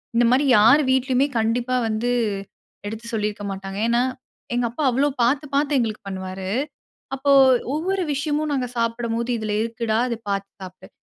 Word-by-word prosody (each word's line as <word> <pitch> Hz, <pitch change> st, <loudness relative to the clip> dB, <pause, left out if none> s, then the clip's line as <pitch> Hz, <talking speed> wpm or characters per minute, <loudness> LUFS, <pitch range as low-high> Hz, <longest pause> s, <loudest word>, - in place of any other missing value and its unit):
இந்த 240 Hz, -, +4 dB
மாரி 275 Hz, +3 st, +3 dB
யார் 240 Hz, +8 st, +6 dB
வீட்லயுமே 260 Hz, +1 st, +2 dB
கண்டிப்பா 240 Hz, +3 st, 0 dB
வந்து 220 Hz, +3 st, -1 dB, 0.8 s
எடுத்து 220 Hz, +2 st, -7 dB
சொல்லியிருக்க 210 Hz, -1 st, -2 dB
மாட்டாங்க. 195 Hz, 0 st, -6 dB
ஏன்னா, 235 Hz, +1 st, +2 dB, 0.5 s
எங்க 245 Hz, 0 st, +1 dB
அப்பா 270 Hz, +6 st, -4 dB
அவ்வளவு 270 Hz, +4 st, +2 dB
பார்த்து 280 Hz, +5 st, +1 dB
பார்த்து 285 Hz, 0 st, +2 dB
எங்களுக்கு 220 Hz, -2 st, -2 dB
பண்ணுவாரு. 190 Hz, 0 st, -5 dB, 0.7 s
அப்போ 280 Hz, +1 st, +1 dB, 0.4 s
ஒவ்வொரு 375 Hz, +5 st, -1 dB
விஷயமும் 295 Hz, +1 st, -1 dB
நாங்க 255 Hz, -3 st, -1 dB
சாப்பிடும்போது, 230 Hz, 0 st, -1 dB
"இதுல 215 Hz, -1 st, -3 dB
இருக்குடா. 230 Hz, -1 st, -2 dB
இதை 235 Hz, -, -2 dB
பார்த்து 195 Hz, 0 st, -2 dB
சாப்பிடு. 185 Hz, 0 st, -11 dB
235 Hz, 145 wpm, -22 LUFS, 215-270 Hz, 0.8 s, யார்